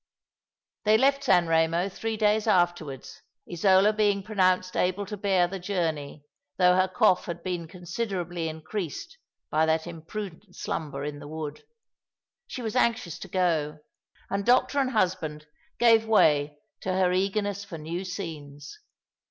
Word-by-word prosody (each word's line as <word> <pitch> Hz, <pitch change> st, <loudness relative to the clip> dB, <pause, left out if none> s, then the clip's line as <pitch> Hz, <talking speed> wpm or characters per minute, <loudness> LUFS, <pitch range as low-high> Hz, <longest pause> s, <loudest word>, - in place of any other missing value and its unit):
They 215 Hz, +1 st, +5 dB
left 275 Hz, +3 st, +2 dB
San 180 Hz, -7 st, +4 dB
Eemo 165 Hz, +3 st, +1 dB
three 225 Hz, +1 st, -3 dB
days 215 Hz, 0 st, +2 dB
afterwards, 175 Hz, -, 0 dB, 0.3 s
Isola 190 Hz, +4 st, +4 dB
being 205 Hz, -2 st, +1 dB
pronounced 185 Hz, -3 st, +1 dB
able 185 Hz, +3 st, 0 dB
to 210 Hz, +2 st, -6 dB
bear 190 Hz, -3 st, +2 dB
the 195 Hz, +2 st, -6 dB
journey, 160 Hz, -6 st, -3 dB, 0.3 s
though 180 Hz, -1 st, +5 dB
her 185 Hz, 0 st, +3 dB
cough 185 Hz, 0 st, +3 dB
had 170 Hz, -, -6 dB
been 175 Hz, -3 st, -3 dB
considerably 175 Hz, -1 st, -4 dB
increased 170 Hz, -, -6 dB, 0.3 s
by 160 Hz, +1 st, +2 dB
that 160 Hz, 0 st, +1 dB
imprudent 175 Hz, +3 st, -8 dB
slumber 140 Hz, -3 st, -4 dB
in 145 Hz, 0 st, -5 dB
the -, -, -10 dB
wood. 155 Hz, -1 st, -6 dB, 0.8 s
She 250 Hz, -, -6 dB
was 220 Hz, +1 st, -3 dB
anxious 230 Hz, -9 st, 0 dB
to -, -, -8 dB
go; 165 Hz, -5 st, 0 dB, 0.5 s
and 200 Hz, 0 st, -1 dB
doctor 255 Hz, +5 st, +3 dB
and 265 Hz, -2 st, +1 dB
husband 175 Hz, -9 st, -1 dB, 0.3 s
gave 225 Hz, -2 st, +5 dB
way 150 Hz, -8 st, +3 dB, 0.2 s
to 185 Hz, -, -3 dB
her 185 Hz, -1 st, +2 dB
eagerness 200 Hz, +1 st, -1 dB
for 195 Hz, -5 st, -8 dB
new 165 Hz, +4 st, -5 dB
scenes. 150 Hz, -6 st, -7 dB
180 Hz, 145 wpm, -27 LUFS, 160-205 Hz, 0.8 s, They